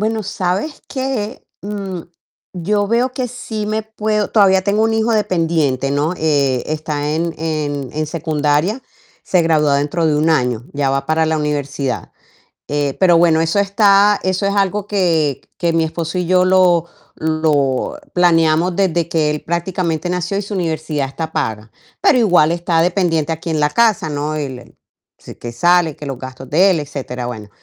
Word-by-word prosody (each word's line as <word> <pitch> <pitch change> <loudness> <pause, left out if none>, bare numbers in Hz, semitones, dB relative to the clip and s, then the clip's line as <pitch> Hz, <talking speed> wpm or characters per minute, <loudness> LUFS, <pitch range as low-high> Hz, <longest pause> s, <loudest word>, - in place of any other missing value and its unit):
Bueno, 220 0 -1
¿sabes 195 - -2
qué?, 260 -5 -4 0.2
mm, 195 -3 -5 0.5
yo 205 +3 0
veo 235 +4 +1
que 255 0 -2
sí 225 -3 -5
me 215 +1 -1
puedo 215 -1 -2
todavía 190 -3 +4
tengo 205 +3 +1
un 225 0 +1
hijo 225 +1 +1
dependiente, 165 - 0
¿no?, 145 +5 0
eh, 140 -6 +1
está 150 -1 -2
en 165 0 -2
en 150 -4 -3
en 155 +1 -2
secundaria, 155 - 0 0.4
se 180 -2 +2
gradúa 150 -3 +3
dentro 150 +3 0
de 155 - +2
1 155 +2 +2
año, 125 -6 +1
ya 140 -1 0
va 135 0 -1
para 160 +2 +1
la 160 0 +1
universidad, 145 -3 -3 0.6
eh, 145 -1 -1
pero 175 -3 +5
bueno, 165 -1 +4
eso 165 +4 0
está 200 0 +4
eso 185 +1 0
es 200 - +1
algo 200 0 0
que 165 -9 +1 0.2
que 170 -2 0
mi 165 -1 +1
esposo 165 +1 -4
y 180 - 0
yo 180 +1 +3
lo 180 -2 +3 0.3
lo 155 - 0 0.2
planeamos 170 0 +3
desde 175 -4 +1
que 160 -3 +1
él 150 0 -3
prácticamente 170 -1 -2
nació 180 +2 -2
y, - - 0
su 205 0 -6
universidad 160 -5 -2
está 160 +4 -5
paga, 110 -4 -3 0.3
pero - - +4
igual 180 -9 +4
está 170 -1 +1
dependiente 170 -3 +1
aquí 165 +1 -4
en 155 -2 0
la 150 - +3
casa, 215 -4 +2
¿no?, 150 +1 -2
él 135 -4 -6 0.4
si - - -12
que 120 0 -8
sale, 175 +4 +3
que 150 - -9
los 135 -2 -4
gastos 130 0 -9
de 185 +6 +4
él, 170 - +1
etcétera, 130 -4 -5
bueno. 110 -4 -7
165 Hz, 175 wpm, -18 LUFS, 150-195 Hz, 0.6 s, pero